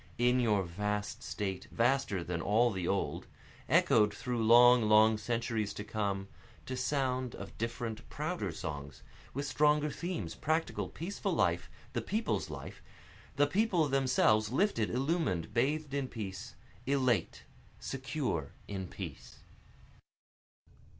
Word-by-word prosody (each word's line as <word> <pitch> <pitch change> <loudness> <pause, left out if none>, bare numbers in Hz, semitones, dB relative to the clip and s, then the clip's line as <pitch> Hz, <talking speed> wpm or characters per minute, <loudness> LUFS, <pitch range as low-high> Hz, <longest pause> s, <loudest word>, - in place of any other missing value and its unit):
In 125 +1 +3
your 105 -5 +2
vast 105 +4 -3
state 95 -2 -4
vaster 120 -6 +1
than 85 -1 -3
all 115 +6 +3
the 95 -3 -3
old, 100 - -1 0.4
Echoed 105 -1 +5
through 120 0 -2
long, 120 +2 +7
long 110 0 +5
centuries 115 -2 -2
to 105 - -5
come, 100 -2 -2 0.4
To 130 - -4
sound 130 -2 -1
of - - -9
different, 115 -1 -4
prouder - - -3
songs, 70 -2 -6 0.3
with 140 +1 -2
stronger 150 +1 +2
themes, 170 - -4
Practical, 160 +2 -1
peaceful 180 +5 -3
life, - - +1 0.2
the - - -1
people's 220 +2 -1
life, - - -8 0.5
the 145 - +4
People 180 0 +2
themselves, 125 -6 +3
Lifted, 135 - +1
illumin'd, 135 - -1
bathed 145 +4 0
in 140 -2 -1
peace 105 -1 -6 0.3
elate, 130 -8 +1 0.4
secure 130 - -3
in 95 -2 -4
peace. - - -9
120 Hz, 125 wpm, -32 LUFS, 105-140 Hz, 0.5 s, long